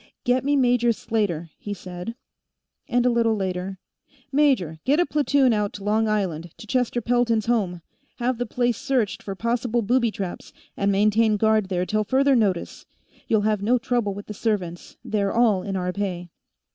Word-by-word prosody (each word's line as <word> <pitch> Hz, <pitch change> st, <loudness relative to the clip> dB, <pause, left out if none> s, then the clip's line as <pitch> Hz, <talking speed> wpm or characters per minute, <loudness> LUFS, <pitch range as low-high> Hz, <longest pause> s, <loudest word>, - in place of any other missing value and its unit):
"Get 250 Hz, 0 st, +2 dB
me 285 Hz, +1 st, +2 dB
Major 245 Hz, -3 st, +3 dB
Slater," 200 Hz, -8 st, -2 dB
he 205 Hz, -1 st, -5 dB
said; 180 Hz, +4 st, -7 dB, 0.7 s
and, 245 Hz, 0 st, +1 dB
a -, -, +5 dB
little 230 Hz, -2 st, +2 dB
later, 190 Hz, -1 st, -3 dB, 0.5 s
"Major, 260 Hz, -, +2 dB
get 285 Hz, +5 st, +2 dB
a 350 Hz, -, +4 dB
platoon 285 Hz, -5 st, +2 dB
out 210 Hz, -1 st, -1 dB
to 200 Hz, -, -8 dB
Long 215 Hz, +2 st, +1 dB
Island, 180 Hz, -6 st, -1 dB
to -, -, -10 dB
Chester 245 Hz, +1 st, 0 dB
Pelton's 230 Hz, -2 st, +1 dB
home; 190 Hz, -8 st, 0 dB, 0.3 s
have 245 Hz, 0 st, -1 dB
the 245 Hz, -, -2 dB
place 240 Hz, 0 st, 0 dB
searched 265 Hz, -7 st, 0 dB
for 195 Hz, -, -6 dB
possible 235 Hz, +2 st, 0 dB
booby 235 Hz, +2 st, +2 dB
traps, 195 Hz, -4 st, -6 dB, 0.2 s
and 200 Hz, 0 st, +1 dB
maintain 210 Hz, +2 st, +3 dB
guard 220 Hz, -1 st, +2 dB
there 180 Hz, -1 st, 0 dB
till 215 Hz, +2 st, 0 dB
further 270 Hz, +5 st, +3 dB
notice. 200 Hz, -7 st, -1 dB, 0.4 s
You'll 220 Hz, -2 st, +3 dB
have 210 Hz, -1 st, +1 dB
no 235 Hz, +5 st, +3 dB
trouble 240 Hz, -5 st, -1 dB
with 205 Hz, -, -8 dB
the 210 Hz, -, -7 dB
servants, 195 Hz, -6 st, -3 dB
they're 200 Hz, -2 st, 0 dB
all 225 Hz, -5 st, +3 dB
in 195 Hz, +1 st, -4 dB
our 180 Hz, -1 st, -2 dB
pay. 180 Hz, -4 st, -4 dB
215 Hz, 175 wpm, -24 LUFS, 195-245 Hz, 0.7 s, a